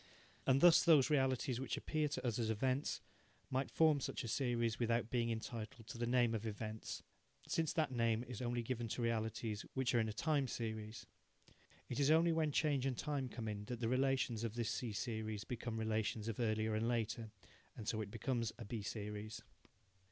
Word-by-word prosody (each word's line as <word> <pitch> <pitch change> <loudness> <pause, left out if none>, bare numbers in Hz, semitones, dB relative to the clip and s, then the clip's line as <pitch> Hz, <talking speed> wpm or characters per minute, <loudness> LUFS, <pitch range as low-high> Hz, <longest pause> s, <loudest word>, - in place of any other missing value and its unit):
And 135 +1 +5
thus 175 -2 +8
those 155 -4 +6
realities 130 -3 +2
which 130 -2 -2
appear 155 -1 0
to 145 -2 -4
us 120 -1 0
as 115 -2 0
events 130 +5 0 0.5
might 130 +1 0
form 155 -3 +4
such - - -3
a - - -4
series 120 -2 0
without 115 -1 +1
being 120 -2 +1
entitled 115 0 -5
to 115 - -8
the 120 - 0
name 120 -1 +3
of 110 0 -2
events, 110 +1 -5 0.4
since 160 -2 +1
that 155 -4 +1
name 115 -2 +1
is 125 -2 -6
only 120 -1 -1
given 120 -1 -2
to 115 - -3
realities 110 -1 -1
which 130 -2 +1
are 120 - +4
in 110 -1 +1
a - - -2
time 145 +4 +1
series. 110 -1 -4 0.8
It - - -3
is 140 0 +4
only 165 +2 +5
when 160 -2 +2
change 140 -3 +2
and 130 -3 -1
time 145 -4 -2
come 115 -2 -5
in 105 -1 -4
that 120 +1 -4
the 115 -2 0
relations 130 -3 +1
of 115 -1 -2
this 120 -1 0
C 120 0 -2
series 110 0 -3
become 120 -2 -4
relations 110 0 -1
of 115 0 -3
earlier 110 -1 +1
and 110 +2 +1
later, 115 -1 -1 0.5
and 110 - -7
so 110 - 0
it 105 - -4
becomes 115 +1 -1
a 115 - -7
B 110 +1 -4
series. 105 +1 -5
115 Hz, 195 wpm, -38 LUFS, 110-130 Hz, 0.8 s, thus